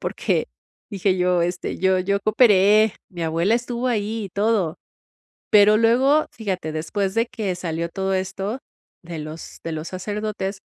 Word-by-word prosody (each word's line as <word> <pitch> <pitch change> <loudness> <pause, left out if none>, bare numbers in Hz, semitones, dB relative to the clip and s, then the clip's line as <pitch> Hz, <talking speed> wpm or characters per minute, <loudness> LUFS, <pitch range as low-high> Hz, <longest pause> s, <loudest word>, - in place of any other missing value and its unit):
Porque - - -1 0.4
dije 195 -1 0
yo 180 -1 +2
este: 175 +1 -3
"Yo 190 0 +3
yo 200 +2 0
cooperé, 215 -1 +4 0.2
mi 175 -2 -6
abuela 165 +7 +1
estuvo 245 +1 -2
ahí 220 -1 -1
y - - -12
todo". 200 -5 0 0.7
Pero 210 0 +6
luego, 260 +7 +4
fíjate, 185 -7 -4
después 190 +5 -2
de 230 +1 +2
que 215 -7 -3
salió 170 -1 -3
todo 190 +1 -2
esto 195 +6 -3 0.4
de 170 -1 -7
los 155 +1 -9
de 165 - -3
los 155 +1 -5
sacerdotes, 200 0 -4
195 Hz, 150 wpm, -22 LUFS, 180-215 Hz, 0.7 s, Pero